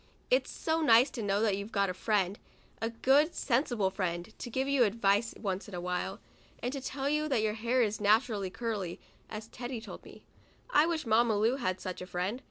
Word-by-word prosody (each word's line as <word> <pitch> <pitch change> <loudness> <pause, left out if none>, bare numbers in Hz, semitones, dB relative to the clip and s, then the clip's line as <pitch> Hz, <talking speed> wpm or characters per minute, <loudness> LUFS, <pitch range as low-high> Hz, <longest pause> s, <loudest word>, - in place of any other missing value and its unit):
It's - - +3
so 320 0 -1
nice 250 -2 +6
to 235 - -5
know 200 0 +1
that 210 -3 +2
you've 200 +3 -6
got 200 -2 +1
a - - -5
friend, 200 0 0 0.4
a 225 - 0
good 270 +7 +3
sensible 235 -6 +1
friend, 175 -2 -3
to - - -5
give 265 +3 -1
you 275 -3 +4
advice 210 0 +2
once 195 -1 -3
in 200 - -8
a - - -3
while, 180 0 -3 0.4
and 245 +2 -3
to 275 - -4
tell 270 +1 -3
you 300 +1 +1
that 250 -7 +1
your 215 -1 +1
hair 235 +3 +1
is 215 -1 -2
naturally 210 -2 +2
curly, 205 -4 -3
just 215 0 -11
as - - -19
Teddy 245 0 -5
told 220 - -10
me. - - -14 0.5
I 305 -5 +5
wish 335 -4 -1
Mamma 225 0 +3
Lu 225 +5 +2
had 185 -8 -1
such 185 -1 -5
a 180 - -6
friend. 185 +7 -2
225 Hz, 215 wpm, -31 LUFS, 200-255 Hz, 0.5 s, nice